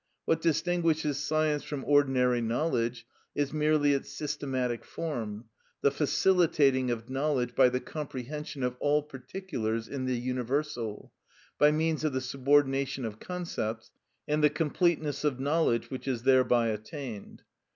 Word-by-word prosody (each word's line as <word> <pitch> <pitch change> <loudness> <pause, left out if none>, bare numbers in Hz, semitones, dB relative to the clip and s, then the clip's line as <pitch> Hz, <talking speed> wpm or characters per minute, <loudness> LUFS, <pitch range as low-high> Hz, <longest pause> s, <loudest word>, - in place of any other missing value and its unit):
What 165 0 +1
distinguishes 165 -3 +1
science 155 -1 +1
from 145 -3 -5
ordinary 130 -4 +3
knowledge 115 -1 -1 0.3
is 145 0 -1
merely 150 -1 +3
its 140 - -2
systematic 130 -4 -2
form, 115 -9 -5 0.4
the 140 - +4
facilitating 145 -4 +3
of 115 -1 -3
knowledge 135 -2 0
by 130 -1 +5
the 125 +1 -2
comprehension 150 0 -6
of 125 0 -1
all 150 0 +2
particulars 130 - -4
in 135 -2 -4
the 130 -1 0
universal, 125 -2 -3 0.5
by 150 - +7
means 155 +1 0
of 155 -3 0
the 130 - 0
subordination 135 0 +1
of 110 -1 -6
concepts, 140 -11 -4 0.4
and 150 +1 +1
the 150 - +7
completeness 155 -1 0
of 140 -4 0
knowledge 140 -5 +1
which 130 +1 -6
is 125 -3 -1
thereby 125 -3 +4
attained. 110 +1 -6
140 Hz, 135 wpm, -29 LUFS, 125-150 Hz, 0.5 s, by